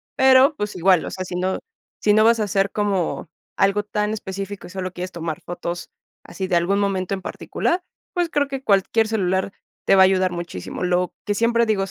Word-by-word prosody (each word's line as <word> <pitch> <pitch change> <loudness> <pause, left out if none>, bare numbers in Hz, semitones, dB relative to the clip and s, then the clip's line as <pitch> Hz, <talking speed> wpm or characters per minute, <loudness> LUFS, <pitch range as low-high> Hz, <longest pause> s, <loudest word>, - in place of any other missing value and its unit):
Pero, 265 +3 +6
pues 210 -3 -3
igual, 180 -1 +4
o - - -5
sea, 185 - -5
si 180 - -6
no 185 +1 -1 0.4
si 210 - +4
no 215 +1 +5
vas 230 0 +4
a - - +2
hacer 200 -1 0
como 195 -7 -1 0.3
algo 200 +1 +2
tan 210 0 -1
específico 195 -1 -6
y - - -13
solo 185 -1 -4
quieres 180 +1 -5
tomar 165 -2 -4
fotos 175 0 -6 0.3
así 190 - -5
de 185 - +1
algún 180 +4 +2
momento 195 -2 -1
en 190 - -3
particular, 355 - -2 0.3
pues 350 -2 0
creo 290 -2 +1
que 270 -1 -5
cualquier 215 +1 +2
celular 190 -3 0 0.3
te - - +5
va 190 - +6
a 190 - +9
ayudar 185 -1 +2
muchísimo. 170 - -6
Lo 180 0 +1
que 205 - 0
siempre 235 +1 +2
digo 205 -3 +1
es, 195 - -5
195 Hz, 210 wpm, -22 LUFS, 185-215 Hz, 0.4 s, a